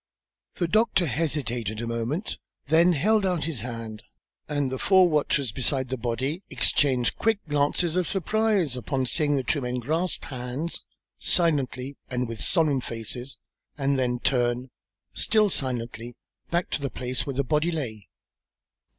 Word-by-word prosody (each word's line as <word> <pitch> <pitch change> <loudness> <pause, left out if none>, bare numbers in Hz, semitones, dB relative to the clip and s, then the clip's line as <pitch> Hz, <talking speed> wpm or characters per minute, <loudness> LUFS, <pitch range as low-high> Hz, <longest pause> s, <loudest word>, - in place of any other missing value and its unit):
The 175 - 0
doctor 215 -1 +3
hesitated 125 - -1
a 115 - -3
moment, 115 - -3 0.3
then 170 +3 +5
held 210 +8 +3
out 180 -4 0
his 150 -4 -2
hand, 115 -2 -6 0.5
and 145 -3 0
the 130 - -3
four 190 -2 +5
watchers 145 -5 +1
beside 130 +2 0
the 130 - -1
body 125 - -2
exchanged 130 -1 +3
quick 225 -1 +2
glances 150 +3 +1
of 180 -2 +1
surprise 200 - +1
upon 130 +2 -1
seeing 145 +2 +2
the 135 - 0
two 140 +4 0
men 125 0 -2
grasp 160 +8 -1
hands, 130 +5 -4 0.4
silently 140 -5 +1
and 125 -1 -1
with 115 -1 -6
solemn 155 -7 +2
faces, 120 +2 -5 0.4
and 140 -1 +1
then 125 -1 +1
turn, 125 0 0 0.4
still 215 -1 +3
silently, 120 -3 -2 0.3
back 170 +1 -1
to - - -1
the 140 - -1
place 125 +2 -3
where 140 - -3
the 140 - +1
body 150 +5 +1
lay. 115 - -5
135 Hz, 150 wpm, -26 LUFS, 125-165 Hz, 0.5 s, then